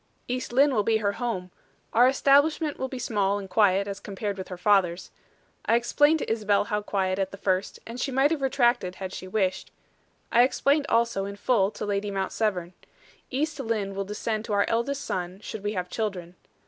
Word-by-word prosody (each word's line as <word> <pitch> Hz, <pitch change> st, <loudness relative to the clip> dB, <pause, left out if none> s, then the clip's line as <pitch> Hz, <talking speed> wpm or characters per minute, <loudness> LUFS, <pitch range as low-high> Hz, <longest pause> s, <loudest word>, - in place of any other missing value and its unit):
"East 250 Hz, 0 st, -3 dB
Lynne 275 Hz, +3 st, +4 dB
will 215 Hz, -, +3 dB
be 220 Hz, +2 st, +2 dB
her 205 Hz, -2 st, 0 dB
home. 200 Hz, -6 st, -4 dB, 0.4 s
Our 245 Hz, +2 st, +6 dB
establishment 285 Hz, +3 st, +3 dB
will 260 Hz, -, -1 dB
be 260 Hz, -, -6 dB
small 205 Hz, -4 st, 0 dB
and 200 Hz, -1 st, -6 dB
quiet, 200 Hz, 0 st, +3 dB
as 200 Hz, 0 st, -5 dB
compared 200 Hz, 0 st, -4 dB
with 190 Hz, -1 st, -7 dB
her 180 Hz, -, -7 dB
father's. 185 Hz, -2 st, +2 dB, 0.6 s
I 230 Hz, -, +4 dB
explained 290 Hz, +6 st, +3 dB
to 290 Hz, -, -3 dB
Isabel 210 Hz, -3 st, +2 dB
how 210 Hz, 0 st, -2 dB
quiet 190 Hz, -2 st, -1 dB
at 190 Hz, -1 st, 0 dB
the 195 Hz, -, -10 dB
first, 190 Hz, -1 st, -1 dB
and 235 Hz, +2 st, -7 dB
she 270 Hz, -, -1 dB
might 270 Hz, +3 st, +3 dB
have 315 Hz, -4 st, -1 dB
retracted 240 Hz, -8 st, +1 dB
had 190 Hz, 0 st, -6 dB
she 185 Hz, -, -7 dB
wished. 190 Hz, -1 st, -1 dB, 0.6 s
I 235 Hz, -, +6 dB
explained 280 Hz, +3 st, +2 dB
also 230 Hz, -4 st, +1 dB
in 200 Hz, 0 st, -6 dB
full 200 Hz, -2 st, +2 dB
to 210 Hz, -, -6 dB
Lady 205 Hz, 0 st, -1 dB
Mount 195 Hz, -1 st, -2 dB
Severn. 185 Hz, -5 st, -1 dB, 0.6 s
East 300 Hz, +3 st, -2 dB
Lynne 220 Hz, -6 st, -2 dB
will 195 Hz, 0 st, -2 dB
descend 215 Hz, +2 st, -3 dB
to 215 Hz, -, -3 dB
our 200 Hz, 0 st, +3 dB
eldest 265 Hz, +5 st, -1 dB
son, 180 Hz, +1 st, -4 dB
should 215 Hz, -1 st, -7 dB
we 205 Hz, +1 st, -1 dB
have 180 Hz, -3 st, -3 dB
children. 185 Hz, -4 st, -4 dB
210 Hz, 200 wpm, -26 LUFS, 195-245 Hz, 0.6 s, Our